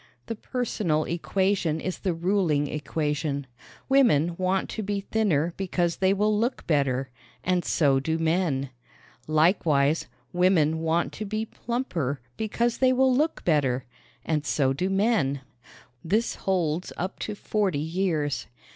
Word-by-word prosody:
The 230 Hz, -, -4 dB
personal 210 Hz, -10 st, -1 dB
equation 175 Hz, -1 st, 0 dB
is 185 Hz, +2 st, -4 dB
the 185 Hz, -4 st, -1 dB
ruling 170 Hz, -4 st, +1 dB
equation. 150 Hz, -1 st, -2 dB, 0.4 s
Women 205 Hz, -, +4 dB
want 185 Hz, +1 st, +1 dB
to -, -, -3 dB
be 205 Hz, -1 st, -2 dB
thinner 175 Hz, -7 st, +1 dB
because 175 Hz, -3 st, 0 dB
they 190 Hz, 0 st, +3 dB
will 210 Hz, +2 st, +2 dB
look 235 Hz, +5 st, -1 dB
better 135 Hz, -4 st, +1 dB, 0.3 s
and 180 Hz, -1 st, +1 dB
so 140 Hz, -4 st, +3 dB
do 160 Hz, +4 st, -1 dB
men. 160 Hz, -5 st, 0 dB, 0.6 s
Likewise, 155 Hz, -2 st, +3 dB, 0.3 s
women 175 Hz, -3 st, +3 dB
want 165 Hz, +1 st, 0 dB
to 215 Hz, -, -5 dB
be 215 Hz, +2 st, -2 dB
plumper 185 Hz, -, -3 dB, 0.2 s
because 235 Hz, +2 st, -1 dB
they 260 Hz, -1 st, +5 dB
will 260 Hz, 0 st, +3 dB
look 305 Hz, +5 st, 0 dB
better 135 Hz, -6 st, +2 dB, 0.4 s
and 155 Hz, -2 st, 0 dB
so 135 Hz, -3 st, +1 dB
do 180 Hz, +8 st, -1 dB
men. 195 Hz, -, +1 dB, 0.6 s
This 215 Hz, +8 st, +1 dB
holds 175 Hz, -3 st, -1 dB
up 185 Hz, +2 st, -4 dB
to 210 Hz, -, -4 dB
forty 205 Hz, -6 st, 0 dB
years. 160 Hz, -2 st, -1 dB
175 Hz, 135 wpm, -26 LUFS, 150-205 Hz, 0.6 s, they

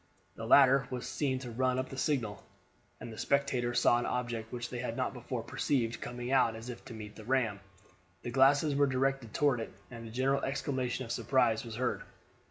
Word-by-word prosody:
The 115 Hz, -, -7 dB
latter 135 Hz, 0 st, +6 dB
was 125 Hz, -2 st, -4 dB
seen 135 Hz, -3 st, -1 dB
to 125 Hz, -2 st, -7 dB
run 130 Hz, +2 st, +1 dB
up 130 Hz, 0 st, -3 dB
a -, -, -6 dB
signal, 120 Hz, -8 st, -1 dB, 0.6 s
and 115 Hz, -, -8 dB
the -, -, -9 dB
spectators 130 Hz, -4 st, +1 dB
saw 120 Hz, -, +5 dB
an -, -, -2 dB
object 120 Hz, -3 st, -3 dB
which 120 Hz, -1 st, -5 dB
they 125 Hz, -, -4 dB
had 120 Hz, -1 st, -3 dB
not -, -, -1 dB
before -, -, -5 dB
perceived 120 Hz, -5 st, -1 dB
coming 120 Hz, +1 st, -5 dB
out 125 Hz, -4 st, +4 dB
as 115 Hz, +2 st, -8 dB
if 120 Hz, -, -10 dB
to 115 Hz, -, -8 dB
meet 105 Hz, -1 st, -9 dB
the 110 Hz, -, -10 dB
ram. 115 Hz, -4 st, +1 dB, 0.6 s
The 120 Hz, -, -4 dB
glasses 140 Hz, +3 st, +4 dB
were 140 Hz, 0 st, +3 dB
directed 135 Hz, -3 st, 0 dB
toward 140 Hz, -2 st, +2 dB
it, 115 Hz, -, -5 dB, 0.2 s
and 115 Hz, -1 st, -8 dB
a -, -, -8 dB
general 135 Hz, +3 st, +1 dB
exclamation 130 Hz, -2 st, -2 dB
of 115 Hz, -, -6 dB
surprise 120 Hz, -1 st, +2 dB
was 115 Hz, -2 st, -7 dB
heard. 125 Hz, +2 st, -1 dB
125 Hz, 205 wpm, -32 LUFS, 115-135 Hz, 0.6 s, latter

